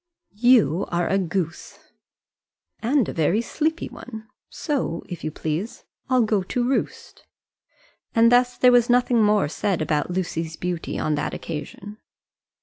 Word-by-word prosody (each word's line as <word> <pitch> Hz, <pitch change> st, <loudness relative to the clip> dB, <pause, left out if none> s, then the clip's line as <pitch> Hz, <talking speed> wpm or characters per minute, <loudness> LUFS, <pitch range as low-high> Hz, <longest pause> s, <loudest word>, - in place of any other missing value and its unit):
"You 215 Hz, -, +4 dB
are 175 Hz, 0 st, 0 dB
a 195 Hz, -, +1 dB
goose." 170 Hz, -2 st, -3 dB, 1.0 s
"And 250 Hz, 0 st, +1 dB
a -, -, -4 dB
very 165 Hz, +6 st, +1 dB
sleepy 315 Hz, +7 st, -2 dB
one; 220 Hz, -3 st, -10 dB, 0.2 s
so, 265 Hz, -, -3 dB
if 175 Hz, -, -8 dB
you 155 Hz, -, -1 dB
please, 160 Hz, +7 st, -4 dB, 0.3 s
I'll 255 Hz, -2 st, +4 dB
go 215 Hz, -2 st, +1 dB
to 240 Hz, +6 st, -2 dB
roost." 270 Hz, -, -3 dB, 0.9 s
And 230 Hz, +1 st, +5 dB
thus 245 Hz, 0 st, +3 dB
there 250 Hz, -, +5 dB
was 245 Hz, -1 st, +4 dB
nothing 245 Hz, -1 st, +3 dB
more 210 Hz, -6 st, +3 dB
said 185 Hz, +4 st, -1 dB
about 155 Hz, -1 st, -1 dB
Lucy's 165 Hz, -3 st, -3 dB
beauty 175 Hz, -1 st, -4 dB
on 155 Hz, -, -1 dB
that 150 Hz, -, -2 dB
occasion. 190 Hz, +7 st, -7 dB
205 Hz, 145 wpm, -23 LUFS, 165-245 Hz, 1.0 s, And